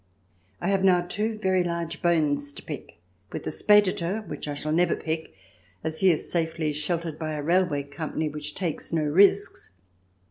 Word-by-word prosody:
I 175 - -1
have 195 -1 +2
now 180 -2 +5
two 215 +5 -2
very 190 -3 +2
large 170 -1 -3
bones 150 -5 +1
to - - -10
pick - - -8 0.3
with - - -5
the - - -3
Speditor, 205 +1 +3
which - - -6
I 145 - -3
shall 155 +2 -3
never 175 +3 +3
pick, 160 0 -4 0.5
as 160 0 -2
he 190 - +5
is 165 - +2
safely 160 -2 -1
sheltered 160 +1 -2
by 155 -1 -3
a 150 -1 -4
railway 170 -3 +2
company 155 +2 -4
which 150 0 -5
takes 175 -5 -2
no 160 -2 +1
risks. 195 - +3
165 Hz, 175 wpm, -26 LUFS, 155-185 Hz, 0.5 s, now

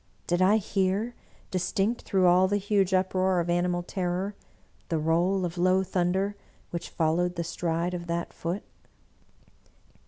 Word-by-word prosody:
Did 175 +1 +1
I 200 +4 +5
hear, 200 +3 0 0.4
distinct 195 +5 0
through 190 -2 +1
all 180 +1 +5
the 205 +2 +1
huge 200 -1 +1
uproar 185 0 +2
of 170 0 0
animal 175 0 +1
ter 180 0 -2
ror, 190 +4 -2 0.6
the 165 - +1
roll 175 +4 +2
of 175 0 -5
low 185 +2 +3
thunder 190 +2 0 0.4
which 170 - -4
followed 175 +2 +1
the 170 - -2
stride 170 +1 -2
of 175 -1 -5
that 170 0 -3
Foot? 175 +5 -3
180 Hz, 150 wpm, -27 LUFS, 175-190 Hz, 0.6 s, I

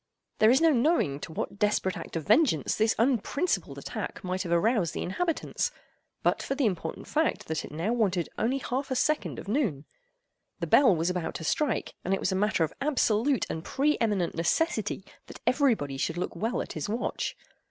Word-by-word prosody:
There 215 - +6
is 260 +5 +5
no 330 -1 +6
knowing 245 - +2
to 160 - -7
what 195 +5 -4
desperate 205 -3 +1
act - - -8
of 165 - -3
vengeance 215 - +3
this 220 +1 +2
unprincipled 265 - 0
attack - - -5
might 185 0 -2
have 175 - -4
aroused 190 0 +2
the - - -2
inhabitants, 330 - -1 0.5
but - - +2
for 270 - -2
the 275 -2 +1
important 175 -6 -2
fact 315 +1 0
that 160 0 -2
it - - -9
now 170 +9 -1
wanted 190 -8 +1
only 245 +5 0
half 265 +1 -3
a 260 - -1
second 305 +4 0
of - - -8
noon. 200 - 0 0.7
The - - -1
bell 255 -10 +6
was 165 +2 0
about 180 -2 -3
to - - -5
strike, 275 - 0
and 190 +2 +1
it - - -5
was - - 0
a - - 0
matter 205 -3 +2
of 155 - -2
absolute 270 -2 +2
and 160 - -4
pre 295 +8 +1
eminent 205 -6 +1
necessity 210 - 0 0.2
that - - -10
every 265 -2 +4
body 140 -6 -5
should 165 +5 -1
look 180 - -3
well 230 +4 -1
at - - -8
his 155 +4 -4
watch. 235 +4 -2
215 Hz, 200 wpm, -28 LUFS, 175-265 Hz, 0.7 s, There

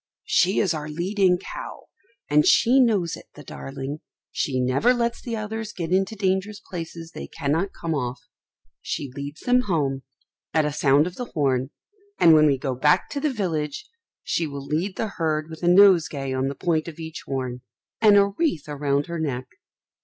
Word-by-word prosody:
She 185 +3 +2
is 190 -5 +2
our 150 -1 -5
leading 180 +3 +1
cow, - - -8 0.4
and 150 0 +4
she 250 - +5
knows 205 -9 +2
it, - - -14
the - - -11
darling. 135 - -6 0.3
She 130 -3 -1
never 130 - +3
lets 235 -1 -1
the 235 -2 -4
others 215 0 -5
get 170 -2 -4
into 190 +3 +1
dangerous 195 +1 -1
places 165 -3 -8
they - - -7
cannot 165 +5 -1
come 165 -1 -2
off; 125 -3 -2 0.6
she 140 -3 -4
leads 145 +2 -7
them 250 0 +3
home, 140 -7 0 0.5
at 155 -1 +4
a 150 - -1
sound 145 0 +4
of 180 0 -6
the 245 - -3
horn; 135 -3 +1 0.5
and 165 - +7
when 155 -1 +6
we 140 -2 +3
go 135 0 -2
back 150 +4 +2
to 285 - -2
the 300 +1 0
village, 160 - -3 0.4
she 165 - -1
will 140 -1 -7
lead 165 +7 -2
the 220 - -1
herd 155 -1 -1
with 160 - -9
a 175 - 0
nosegay 175 -8 +5
on 130 +1 0
the 140 - -3
point 160 -1 0
of 165 - -8
each 160 -1 -7
horn, 130 -2 -3 0.4
and 210 -2 +7
a 200 - +6
wreath 200 - -1
round 145 -1 0
her 170 -1 -5
neck. 130 -5 -2
160 Hz, 185 wpm, -24 LUFS, 140-195 Hz, 0.6 s, and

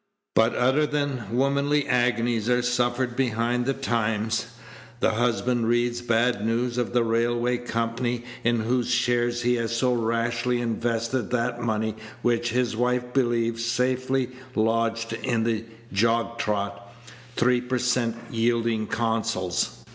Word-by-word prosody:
But 115 +1 +3
other 135 +5 +3
than 145 -5 -2
womanly 140 +3 +2
agonies 120 -2 +1
are 125 0 +2
suffered 120 0 0
behind 120 -1 0
the 135 - +1
Times. 115 -4 -1 0.5
The - - +3
husband 120 +1 +1
reads 120 0 +1
bad 120 -2 +1
news 120 +2 0
of 120 - -1
the 120 -1 +3
railway 120 +2 +1
company 120 +1 -2 0.2
in 115 -1 +2
whose 120 +2 0
shares 120 0 +1
he 125 0 +2
has 115 0 -1
so 125 +1 +2
rashly 120 +1 0
invested 115 0 -1
that 120 0 -1
money 110 -1 -1 0.3
which 120 0 +1
his 120 -1 0
wife 125 +1 0
believes 115 -3 +1
safely 130 +2 0 0.3
lodged 115 +1 0
in 115 0 -1
the 115 -1 -1 0.3
jog 115 +3 +1
trot, 100 -1 -2 0.4
three 125 0 +3
per 125 +1 -2
cent 125 -2 +1 0.2
yielding 115 -1 +1
Consols. 115 -6 -1
120 Hz, 130 wpm, -25 LUFS, 115-125 Hz, 0.5 s, But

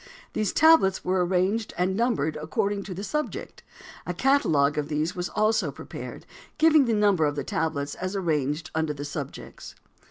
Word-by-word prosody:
These 215 -2 0
tablets 315 -12 +4
were 185 0 +2
arranged 190 +5 0
and 185 +2 +1
numbered 210 - 0
according 200 +6 -1
to 185 - -6
the 195 - -6
subject. 300 +8 -4 0.5
A - - -3
catalogue 155 - +2
of 145 - -2
these 155 +3 -1
was 180 0 -3
also 215 +1 +1
prepared, - - -9 0.3
giving 310 -3 +5
the 235 - +1
number 200 -6 +3
of 145 - -2
the - - -3
tablets 145 -3 -2
as 185 +2 -4
arranged 155 -4 -1
under 160 -1 0
the 145 +1 -6
subjects. 145 - -7
185 Hz, 165 wpm, -26 LUFS, 155-215 Hz, 0.5 s, giving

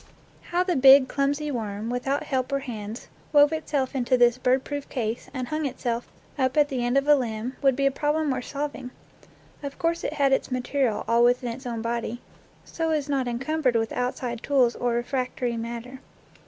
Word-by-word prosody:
How 355 +1 +2
the 365 -2 0
big, 265 0 +8
clumsy 285 +2 -1
worm, 220 -2 -4
without 270 +4 -1
help 265 -3 -2
or 275 - +2
hands, 220 -4 -7 0.2
wove 290 +1 +6
itself 290 -4 -1
into 255 -1 +1
this 240 0 +4
bird 255 +1 +2
proof 285 0 -5
case, 230 -2 -3
and 255 -2 -4
hung 310 -1 -1
itself 240 -2 -3 0.3
up 260 +1 +1
at 295 -1 +4
the 255 -4 -2
end 245 +2 +1
of 275 +1 +1
a 295 - +8
limb, 245 -2 -2
would 270 -2 +4
be 275 +1 0
a 275 - +4
problem 295 +1 0
worth 255 -1 -3
solving. 285 -3 -4 0.7
Of 280 -1 -6
course 335 0 -1
it - - -2
had 280 -3 +2
its - - 0
material 255 -2 -1
all 235 +1 +4
within 245 0 +2
its 255 +2 -9
own 230 -2 -4
body, 235 0 -3 0.5
so 325 -1 -2
is 300 -2 -1
not 270 -3 0
encumbered 260 +2 0
with 225 -1 +1
outside 245 -1 -3
tools 255 -4 +2
or 245 -1 -1
refractory 250 0 -2
matter. 235 +3 -6
260 Hz, 195 wpm, -25 LUFS, 240-285 Hz, 0.7 s, big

